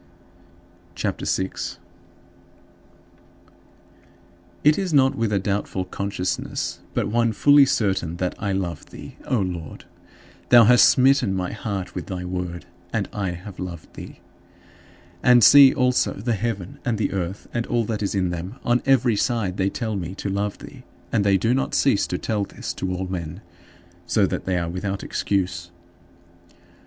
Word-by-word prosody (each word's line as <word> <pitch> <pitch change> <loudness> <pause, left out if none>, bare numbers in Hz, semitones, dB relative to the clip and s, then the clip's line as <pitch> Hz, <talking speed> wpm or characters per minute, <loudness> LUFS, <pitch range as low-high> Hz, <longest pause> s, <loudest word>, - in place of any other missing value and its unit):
CHAPTER - - -3
VI - - +1 0.3
8. - - -27 2.8
It 150 +4 +4
is 190 -3 -2
not 135 -1 +4
with 115 -2 -1
a 100 - +2
doubtful 100 -1 -2
consciousness, 95 0 -3 0.2
but - - 0
one 115 +1 +1
fully 145 +5 +6
certain 95 -8 0
that 90 0 -1
I 100 - -2
love 90 -4 -3
thee, - - -11
O 130 - 0
Lord. 90 -5 -4 0.6
Thou 120 -1 +8
hast 120 +2 +7
smitten 130 -6 +3
my 90 -1 -2
heart 100 -3 -5
with 90 - -6
thy 90 -2 -5
Word, 90 -1 -5 0.3
and 105 -3 -2
I 100 -3 -2
have 90 +2 -10
loved 85 -3 -7
thee. - - -11 1.0
And 125 -2 +6
see 140 +4 +9
also 125 -2 +1
the 115 +4 -2
heaven, 100 -3 -4
and 115 -3 -1
earth, 95 +1 -4
and 120 -1 -2
all 120 -1 +1
that 110 -1 -3
is 100 0 -2
in 90 -2 0
them 90 +5 -5
on 120 +1 +2
every 125 -4 +4
side 100 -4 -1
they 95 0 +1
tell 110 -1 -3
me 90 -1 -5
to 100 - -4
love 100 +1 -2
thee, - - -12 0.3
and 105 - +2
they 100 -1 +4
do 115 +6 +1
not 135 - -1
cease - - +2
to - - -2
tell 105 -2 -1
this - - -6
to 95 - -4
all 90 +1 -3
men, 90 0 -5 0.7
"so 105 -3 +3
that - - -3
they 95 -1 0
are 85 -1 -1
without 95 +3 -4
excuse." 90 -3 -2
100 Hz, 160 wpm, -23 LUFS, 90-115 Hz, 2.8 s, see